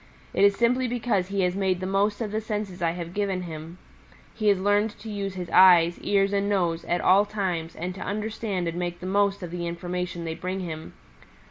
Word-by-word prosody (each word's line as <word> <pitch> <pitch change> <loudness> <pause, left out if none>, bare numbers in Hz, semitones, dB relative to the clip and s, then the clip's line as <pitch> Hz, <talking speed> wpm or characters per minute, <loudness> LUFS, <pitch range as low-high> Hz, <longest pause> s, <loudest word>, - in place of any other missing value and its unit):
It - - +2
is 200 0 +6
simply 250 +3 +2
because 235 -6 0
he 195 0 -1
has 180 0 +1
made 190 -2 0
the 185 - -4
most 200 +3 +1
of 215 -3 -2
the 215 +1 -1
senses 210 -4 -4
I 165 -1 +1
have 170 -1 -6
given 195 -2 -1
him. 165 0 -8 0.6
He 215 - -2
has 200 -2 +4
learned 205 +2 +2
to 220 - -8
use 200 -2 -4
his 180 -2 -5
eyes, 175 -2 +6
ears 200 0 +1
and 200 0 +1
nose 175 -4 0
at 175 0 0
all 195 +2 +5
times 185 -6 -3
and 180 +2 -4
to 190 - -10
understand 210 -3 -3
and 170 +1 -3
make 175 0 -3
the 180 - -8
most 200 0 +1
of 175 - -6
the 175 -1 -3
information 175 0 -4
they 160 - -3
bring 185 +3 -4
him. 160 -3 -6
190 Hz, 220 wpm, -26 LUFS, 175-205 Hz, 0.6 s, is